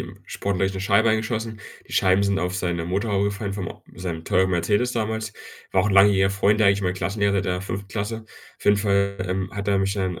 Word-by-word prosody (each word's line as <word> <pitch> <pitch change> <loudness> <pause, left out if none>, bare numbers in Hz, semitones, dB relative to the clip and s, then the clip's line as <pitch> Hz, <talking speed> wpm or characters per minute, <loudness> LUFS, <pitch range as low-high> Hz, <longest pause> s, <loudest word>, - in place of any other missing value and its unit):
im - - -8
Sportunterricht 95 -1 -1
'ne 95 - -4
Scheibe 100 +3 +3
eingeschossen. 110 0 -1 0.3
Die - - -12
Scheiben 95 +1 +4
sind 100 -1 +1
auf 90 +1 -2
seine 85 -2 -2
Motorhaube 100 +2 0
gefallen, 100 0 -3
vom 95 -3 -4
o - - -9
seinem 85 -3 -5
teuren 95 +1 +2
Mercedes 105 +8 +1
damals. 110 -1 -2 0.4
War 95 - +3
auch 100 - +1
'n 100 - 0
langjähriger 95 -1 +6
Freund 100 +2 +2
eigentlich, 100 -1 +4
mein 90 -1 +1
Klassenlehrer 100 +1 0
der 90 -1 -2
5. 100 +1 -5
Klasse. 110 +2 -4 0.3
Auf - - -14
jeden 105 - +5
Fall, 100 -1 +1
ähm, 95 +1 -2
hat 100 0 -3
er 100 -1 +3
mich 95 0 0
dann 95 -4 -2
100 Hz, 220 wpm, -23 LUFS, 95-105 Hz, 0.4 s, langjähriger